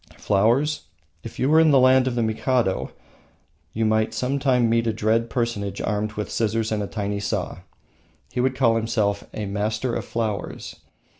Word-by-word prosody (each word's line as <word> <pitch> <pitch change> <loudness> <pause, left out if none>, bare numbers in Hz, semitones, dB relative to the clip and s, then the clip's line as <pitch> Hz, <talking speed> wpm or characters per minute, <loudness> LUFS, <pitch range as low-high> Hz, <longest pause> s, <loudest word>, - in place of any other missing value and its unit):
Flowers, 120 +10 +1 0.4
if - - -9
you 130 - +1
were 155 +2 +5
in 160 -1 +5
the 140 - +5
land 130 0 +5
of 125 - -1
the 120 - +1
Mikado, 110 -1 0 0.8
you 110 +5 -1
might 110 0 +1
some 135 +2 -1
time 125 -4 +2
meet 115 0 +1
a 110 - +1
dread 110 +2 +1
personage 115 -5 -2
armed 105 +1 -2
with 105 -1 -5
scissors 110 0 0
and 105 -1 0
a 100 - -3
tiny 100 -1 -3
saw. 100 -3 -3 0.7
He - - -3
would 130 +1 +1
call 115 -4 +3
himself 110 -3 0
a 105 - -4
Master 110 +4 -2
of - - -2
Flowers. 110 -5 -4
115 Hz, 175 wpm, -23 LUFS, 105-125 Hz, 0.8 s, were